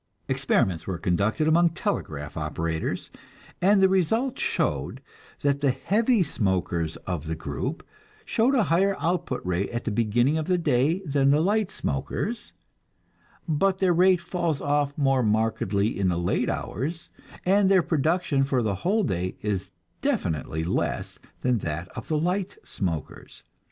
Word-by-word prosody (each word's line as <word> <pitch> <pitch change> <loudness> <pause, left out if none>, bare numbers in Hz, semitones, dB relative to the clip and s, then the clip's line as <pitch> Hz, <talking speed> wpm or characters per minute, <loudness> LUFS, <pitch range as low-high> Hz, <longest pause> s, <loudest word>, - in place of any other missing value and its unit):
Experiments 90 -4 +1
were 95 -2 -2
conducted 100 - +1
among 170 +2 +5
telegraph 80 - -3
operators, 80 +1 -3 0.5
and 195 +1 +5
the - - +8
result 220 - +1
showed - - -1 0.4
that 140 0 +1
"the 140 - +3
heavy 205 - +2
smokers 90 - -1
of 85 -4 -3
the 80 - -2
group 80 - -4 0.4
show 235 +3 +2
a 240 - +4
higher 195 +3 +2
output 165 - -1
rate 90 +2 -1
at 120 0 -4
the 115 - -2
beginning 120 +7 +2
of 155 - -4
the 180 -1 +2
day 155 +3 +1
than 140 -2 +2
the 145 +2 +4
light 205 +4 +1
smokers, 205 - -3 1.0
but 190 +5 +2
their 190 -2 +3
rate 180 +1 +5
falls 170 -5 -1
off 145 0 0
more 135 -3 +3
markedly 110 -2 0
in 95 - +2
the 90 -2 +1
late 85 +1 0
hours, 165 +7 -4 0.3
and 195 +1 +4
their 190 -3 +5
production 160 -2 +1
for 135 -3 +1
the 105 -2 0
whole 210 +4 +2
day 90 - -2
is 100 -3 -2 0.3
definitely 80 0 -1
less 85 - -2 0.2
than 125 -3 +2
that 85 0 -4
of - - -8
the 155 - 0
light 180 +4 -1
smokers. 85 -6 -5
140 Hz, 150 wpm, -26 LUFS, -, 1.0 s, the